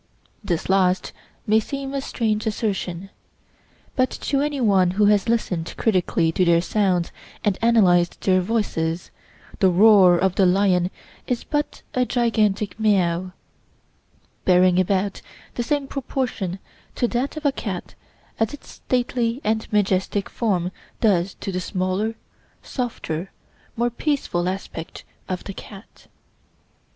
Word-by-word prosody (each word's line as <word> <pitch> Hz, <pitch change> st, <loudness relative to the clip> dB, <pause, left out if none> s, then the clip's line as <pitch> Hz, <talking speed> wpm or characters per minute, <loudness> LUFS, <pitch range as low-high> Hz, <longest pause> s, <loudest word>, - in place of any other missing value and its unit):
This 170 Hz, -4 st, -2 dB
last 185 Hz, -1 st, +2 dB, 0.3 s
may 215 Hz, +1 st, +4 dB
seem 275 Hz, +4 st, -5 dB
a 275 Hz, -, -1 dB
strange 220 Hz, -4 st, -1 dB
assertion; 195 Hz, -4 st, -3 dB, 0.8 s
but 255 Hz, 0 st, +2 dB
to 275 Hz, -2 st, -1 dB
any 290 Hz, -1 st, -1 dB
one 195 Hz, -6 st, +4 dB
who 210 Hz, -, +5 dB
has 205 Hz, +1 st, +3 dB
listened 180 Hz, -8 st, -1 dB
critically 180 Hz, -5 st, +1 dB
to 185 Hz, -, +1 dB
their 170 Hz, -1 st, +4 dB
sounds 185 Hz, -2 st, 0 dB, 0.3 s
and 205 Hz, -2 st, +2 dB
analyzed 185 Hz, -7 st, +4 dB
their 185 Hz, -1 st, +3 dB
voices, 175 Hz, -5 st, -1 dB, 0.5 s
the 190 Hz, -3 st, +5 dB
roar 190 Hz, -1 st, +6 dB
of 190 Hz, 0 st, +1 dB
the 190 Hz, -1 st, +3 dB
lion 180 Hz, -1 st, +3 dB, 0.4 s
is 245 Hz, -2 st, -1 dB
but 295 Hz, -1 st, -3 dB
a 255 Hz, -, +2 dB
gigantic 220 Hz, -5 st, 0 dB
meow, 185 Hz, -4 st, +1 dB, 1.1 s
bearing 180 Hz, 0 st, +4 dB
about 195 Hz, +1 st, 0 dB, 0.3 s
the -, -, -2 dB
same 285 Hz, +3 st, 0 dB
proportion 250 Hz, -9 st, -3 dB, 0.4 s
to 245 Hz, -, +1 dB
that 255 Hz, +5 st, -2 dB
of 310 Hz, -, -6 dB
a 285 Hz, -, +4 dB
cat 195 Hz, -9 st, -5 dB, 0.5 s
as 225 Hz, +5 st, 0 dB
its 290 Hz, -, -18 dB
stately 245 Hz, -1 st, -1 dB
and 220 Hz, +1 st, -1 dB
majestic 200 Hz, -1 st, 0 dB
form 185 Hz, -6 st, 0 dB, 0.3 s
does 190 Hz, -4 st, +2 dB
to 195 Hz, -, -5 dB
the 185 Hz, -, -2 dB
smaller, 185 Hz, +5 st, -1 dB, 0.5 s
softer, 195 Hz, -, -4 dB, 0.5 s
more 240 Hz, +1 st, +1 dB
peaceful 235 Hz, -, -1 dB
aspect 185 Hz, -3 st, -6 dB, 0.3 s
of 185 Hz, -1 st, -3 dB
the 200 Hz, -, -6 dB
cat. 195 Hz, +2 st, -13 dB
200 Hz, 130 wpm, -23 LUFS, 180-230 Hz, 1.1 s, roar